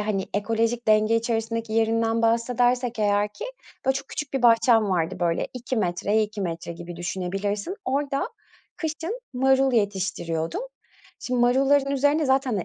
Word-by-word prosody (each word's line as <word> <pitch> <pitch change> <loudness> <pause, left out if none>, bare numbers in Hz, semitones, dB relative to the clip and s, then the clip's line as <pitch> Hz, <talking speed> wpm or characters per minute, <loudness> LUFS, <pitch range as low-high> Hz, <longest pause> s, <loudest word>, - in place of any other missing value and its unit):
hani, 205 -2 -1
ekolojik 230 +2 0
denge 215 +1 +4
içerisindeki 230 -1 -2
yerinden 225 0 +1
bahsedersek 245 +1 +1
eğer 205 0 +2
ki, 210 - -7 0.4
böyle, 265 - +3
çok 270 0 -5
küçük 300 -2 -5
bir 265 - 0
bahçem 230 -3 +5
vardı. 165 -2 0
Böyle, 170 -1 +1
2 250 0 -4
metreye 205 +3 +1
2 210 0 -4
metre 170 -2 -4
gibi 175 0 -9
düşünebilirsin. 195 - -3
Orada 275 +1 -1 0.5
kışın 330 +9 -4
marul 265 +1 +3
yetiştiriyordum. 195 - -1 0.6
Şimdi 250 -1 -1
marulların 270 +3 +3
üzerine 285 +2 +2
zaten, 265 0 +2
hani, 195 -4 -1
230 Hz, 140 wpm, -25 LUFS, 205-265 Hz, 0.6 s, bahçem